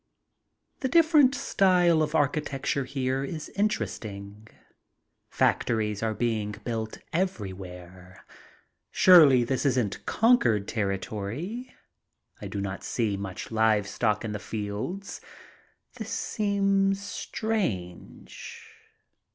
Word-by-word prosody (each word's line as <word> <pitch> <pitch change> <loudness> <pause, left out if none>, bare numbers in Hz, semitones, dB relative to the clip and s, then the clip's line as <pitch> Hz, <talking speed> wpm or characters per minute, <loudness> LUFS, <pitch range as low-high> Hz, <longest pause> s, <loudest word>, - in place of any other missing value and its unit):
The 260 - -1
different 310 -5 +5
style 180 - +3
of 155 +1 -1
architecture 140 -2 0
here 130 0 -2
is 155 +2 -6
interesting. 105 - -3 0.8
Factories 105 -3 0
are 110 -1 -1
being 110 -3 -1
built 110 -2 -4 0.2
everywhere. 95 - -5 0.6
Surely 150 -9 +7
this 130 +2 -1
isn't 125 -7 0
conquered 120 - +3
territory. 110 - -4 0.7
I - - -5
do 100 - -5
not 100 -1 -4
see 110 -4 -1
much 95 +1 -6
live 110 -2 +3
stock 105 0 0
in 110 - -3
the 105 - -4
fields. 110 - -5 0.8
This 220 -2 -6
seems 195 -3 +1
strange. 195 - -4
120 Hz, 95 wpm, -27 LUFS, -, 0.8 s, Surely